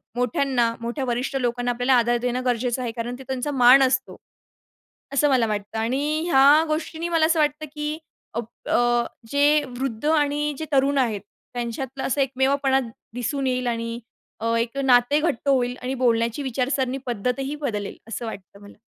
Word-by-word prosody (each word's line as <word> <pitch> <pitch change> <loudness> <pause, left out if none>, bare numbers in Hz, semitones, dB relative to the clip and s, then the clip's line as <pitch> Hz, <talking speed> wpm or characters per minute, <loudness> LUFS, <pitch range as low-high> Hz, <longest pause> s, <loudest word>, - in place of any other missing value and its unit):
मोठ्यांना, 245 -1 +1
मोठ्या 240 +4 -3
वरिष्ठ 250 +2 -2
लोकांना 245 0 -1
आपल्याला 245 +2 +1
आदर 240 +1 +2
देणं 250 +1 -2
गरजेचं 245 0 0
आहे, 240 -2 -2
कारण 235 +1 -4
ते - - -9
त्यांचा 265 +2 -2
मान 260 0 +7
असतो. 265 0 0 1.0
असं 290 +1 +3
मला 250 -4 +3
वाटतं 210 0 -4
आणि 280 +7 0
ह्या 285 +1 +6
गोष्टींनी 320 +2 -3
मला 330 -2 +3
असं 325 0 +2
वाटतं 300 +1 +1
की 300 0 -3 0.4
अप 235 -1 -3 0.2
अ, 240 0 +3 0.3
जे 290 +1 +4 0.2
वृद्ध 260 -2 -3
आणि 295 -1 +1
जे 315 - -3
तरुण 280 0 +3
आहेत, 225 -6 +1 0.3
त्यांच्यातला 245 +3 -4
असा 275 +2 0
एकमेवपणा 270 0 +2 0.3
दिसून 255 +3 -2
येईल 255 -1 -1
आणि 230 0 -2 0.4
अ, 230 +1 0
एक 230 +3 -2
नाते 255 +2 +4
घट्ट 290 -4 -1
होईल 250 -2 +2
आणि 255 +1 -3
बोलण्याची 235 +1 +1
विचारसरणी, 260 0 -1
पद्धतही 250 +5 -2
बदलेल, 220 -9 -4
असं 230 +1 -5
वाटतं 200 -3 -9
मला. 205 0 -14
255 Hz, 160 wpm, -23 LUFS, 240-280 Hz, 1.0 s, मान